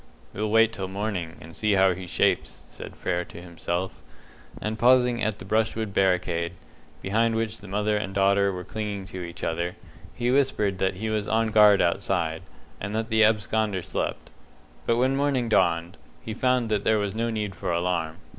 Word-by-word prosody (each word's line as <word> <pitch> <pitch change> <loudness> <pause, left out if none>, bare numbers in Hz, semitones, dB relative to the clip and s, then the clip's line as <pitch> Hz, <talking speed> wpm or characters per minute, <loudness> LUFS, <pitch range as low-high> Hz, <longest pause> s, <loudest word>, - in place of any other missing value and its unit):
"We'll 105 +1 -2
wait 115 +1 +4
till 95 -4 -4
morning, 95 -4 -3
and 80 +1 -12
see 105 -1 +1
how 95 -1 +4
he 90 +1 -8
shapes," - - 0
said - - -10
Frere 90 -1 -1
to - - -11
himself; 85 +1 -4 0.6
and 110 +1 -3
pausing 125 0 +4
at 110 -1 0
the - - -10
brushwood 110 0 0
barricade, 90 -3 +1 0.5
behind 115 +3 +1
which 110 -1 -2
the 100 - -11
mother 105 +2 0
and 100 -2 -3
daughter 100 0 +3
were 90 -1 -5
clinging 105 -1 -4
to 95 - -5
each 85 0 -8
other, 85 +2 -2 0.4
he 120 +1 0
whispered 125 -8 +1
that 95 0 +1
he 110 +3 -3
was 105 -1 -1
on 110 0 +1
guard 105 -2 +6
outside, 85 -2 0 0.4
and 100 +2 -4
that 110 +1 -2
the 110 -1 +4
absconder 105 -3 +1
slept. - - -4 0.6
But 115 - +3
when 130 +2 +2
morning 135 -4 +1
dawned, 85 -4 +2 0.3
he 110 - -5
found 125 0 +1
that 105 -2 0
there 110 - +3
was 100 -2 -1
no 115 +1 -1
need 105 -3 -2
for 90 - -3
alarm. 85 -2 -1
105 Hz, 185 wpm, -26 LUFS, 90-110 Hz, 0.6 s, guard